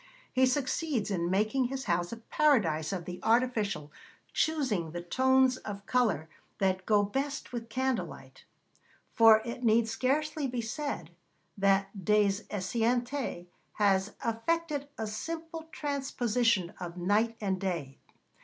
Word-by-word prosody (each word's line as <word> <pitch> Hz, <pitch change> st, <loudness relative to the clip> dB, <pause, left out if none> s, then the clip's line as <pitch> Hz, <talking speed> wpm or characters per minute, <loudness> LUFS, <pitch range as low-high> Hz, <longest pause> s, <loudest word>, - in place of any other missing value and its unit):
He 260 Hz, 0 st, +4 dB
succeeds 255 Hz, -3 st, -1 dB
in 170 Hz, -3 st, 0 dB
making 215 Hz, +7 st, +2 dB
his 265 Hz, +2 st, -3 dB
house 175 Hz, -3 st, 0 dB
a 230 Hz, -, -5 dB
paradise 215 Hz, -, +2 dB
of 180 Hz, -3 st, -4 dB
the 180 Hz, 0 st, -6 dB
artificial, 220 Hz, -10 st, +1 dB, 0.4 s
choosing 260 Hz, -, 0 dB
the 175 Hz, -, -4 dB
tones 260 Hz, +5 st, +3 dB
of 200 Hz, -4 st, -7 dB
colour 215 Hz, -, +1 dB, 0.3 s
that 190 Hz, -1 st, 0 dB
go 210 Hz, -2 st, +4 dB
best 270 Hz, +6 st, -3 dB
with 230 Hz, -1 st, -5 dB
candle 260 Hz, +1 st, 0 dB
light, -, -, -13 dB, 0.7 s
for 220 Hz, -2 st, +7 dB
it 240 Hz, +1 st, -5 dB
need 225 Hz, 0 st, +4 dB
scarcely 280 Hz, +5 st, 0 dB
be 250 Hz, -1 st, -3 dB
said 225 Hz, -, -4 dB, 0.4 s
that 195 Hz, 0 st, +1 dB
Des 205 Hz, 0 st, +3 dB
Esseintes 235 Hz, +1 st, -1 dB, 0.3 s
has 200 Hz, -1 st, +2 dB
effected 290 Hz, +5 st, -1 dB
a 220 Hz, -, -2 dB
simple 325 Hz, +9 st, -5 dB
transposition 245 Hz, -, 0 dB
of 175 Hz, -1 st, -6 dB
night 210 Hz, +6 st, +1 dB
and 190 Hz, -3 st, -1 dB
day. 165 Hz, -8 st, -3 dB
225 Hz, 130 wpm, -30 LUFS, 195-260 Hz, 0.7 s, for